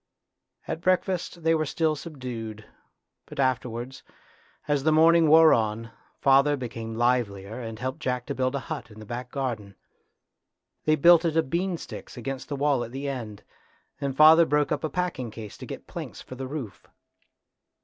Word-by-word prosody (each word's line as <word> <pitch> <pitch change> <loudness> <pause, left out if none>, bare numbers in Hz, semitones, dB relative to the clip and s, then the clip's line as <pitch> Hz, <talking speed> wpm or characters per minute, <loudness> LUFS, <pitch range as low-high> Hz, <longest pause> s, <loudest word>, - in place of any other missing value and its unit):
At 160 - -4
breakfast 180 -1 0
they 165 0 +4
were 155 -2 0
still 155 +1 +1
subdued, 120 -8 -7 0.6
but - - -10
afterwards, 130 -1 -1 0.7
as 145 -2 +1
the 155 - +3
morning 165 +1 +5
wore 160 +1 +8
on, 115 0 -1 0.3
father 140 +2 +4
became 115 -3 -6
livelier 115 -3 0
and 115 -2 -6
helped 130 +3 -4
Jack 125 -1 -2
to - - -3
build 130 +1 -1
a 140 - -2
hut 110 - -6
in 105 - -15
the 110 - -10
back 125 +3 -6
garden. 115 -8 -4 1.1
They 155 - +4
built 170 +3 +6
it 165 -2 0
of 150 -5 +1
bean 180 +1 0
sticks 150 - -9
against 135 +4 -5
the 145 - -2
wall 140 -3 +1
at 115 - -8
the 135 +2 -5
end, 115 -7 -5 0.6
and 135 -1 -3
father 160 +2 +8
broke 150 0 +1
up 150 - -1
a 155 - -1
packing 175 -10 -2
case 110 -1 -9
to - - -9
get - - -8
planks - - -7
for - - -10
the 130 +1 -6
roof. 130 -7 -7
135 Hz, 175 wpm, -26 LUFS, 115-155 Hz, 1.1 s, wore